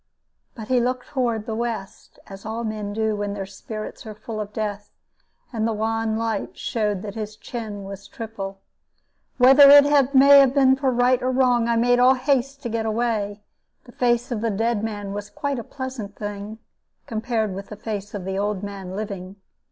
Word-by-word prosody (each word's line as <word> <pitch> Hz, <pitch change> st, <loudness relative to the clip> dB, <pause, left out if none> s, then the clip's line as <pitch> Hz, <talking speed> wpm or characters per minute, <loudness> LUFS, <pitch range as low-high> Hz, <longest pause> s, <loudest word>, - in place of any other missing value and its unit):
But 220 Hz, -3 st, -9 dB
he 255 Hz, -1 st, +4 dB
looked 250 Hz, +1 st, -2 dB
toward 235 Hz, -5 st, -1 dB
the 225 Hz, -, -4 dB
west, 225 Hz, -3 st, -5 dB
as 195 Hz, 0 st, -11 dB
all 225 Hz, +2 st, -4 dB
men 215 Hz, -2 st, -4 dB
do 220 Hz, 0 st, 0 dB
when 205 Hz, 0 st, -3 dB
their 195 Hz, -1 st, -4 dB
spirits 215 Hz, +3 st, -8 dB
are 215 Hz, -, -7 dB
full 215 Hz, +1 st, -7 dB
of 205 Hz, 0 st, -6 dB
death, 205 Hz, -1 st, -4 dB, 0.6 s
and 225 Hz, -1 st, 0 dB
the 225 Hz, -, 0 dB
wan 220 Hz, 0 st, -1 dB
light 225 Hz, 0 st, -3 dB
showed 210 Hz, -5 st, -1 dB
that 205 Hz, -2 st, -6 dB
his 215 Hz, -1 st, -6 dB
chin 215 Hz, -2 st, -6 dB
was 195 Hz, 0 st, -9 dB
triple. 195 Hz, -4 st, -7 dB, 0.8 s
Whether 270 Hz, +3 st, +8 dB
it 285 Hz, -1 st, +6 dB
may 280 Hz, +1 st, +9 dB
have 270 Hz, 0 st, +4 dB
been 265 Hz, -2 st, +5 dB
right 255 Hz, -2 st, +2 dB
or 255 Hz, -, 0 dB
wrong, 250 Hz, -2 st, +3 dB
I 235 Hz, -, +2 dB
made 245 Hz, +1 st, +3 dB
all 255 Hz, +2 st, +6 dB
haste 275 Hz, +1 st, 0 dB
to -, -, -2 dB
get 225 Hz, 0 st, -2 dB
away. 215 Hz, -2 st, -1 dB, 0.4 s
The 245 Hz, -, -15 dB
face 240 Hz, +1 st, 0 dB
of 225 Hz, -3 st, -2 dB
the 230 Hz, -, 0 dB
dead 225 Hz, +1 st, 0 dB
man 205 Hz, -3 st, -4 dB
was 205 Hz, 0 st, -6 dB
quite 280 Hz, +3 st, -3 dB
a -, -, -5 dB
pleasant 255 Hz, -6 st, -7 dB
thing, 205 Hz, +1 st, -6 dB, 0.5 s
compared 220 Hz, -2 st, -2 dB
with 195 Hz, +1 st, -7 dB
the 210 Hz, -, -7 dB
face 205 Hz, -1 st, -5 dB
of 190 Hz, -3 st, -5 dB
the 190 Hz, 0 st, -2 dB
old 205 Hz, -1 st, -2 dB
man 195 Hz, -2 st, -6 dB
living. 195 Hz, -2 st, -6 dB
220 Hz, 190 wpm, -23 LUFS, 205-245 Hz, 0.8 s, may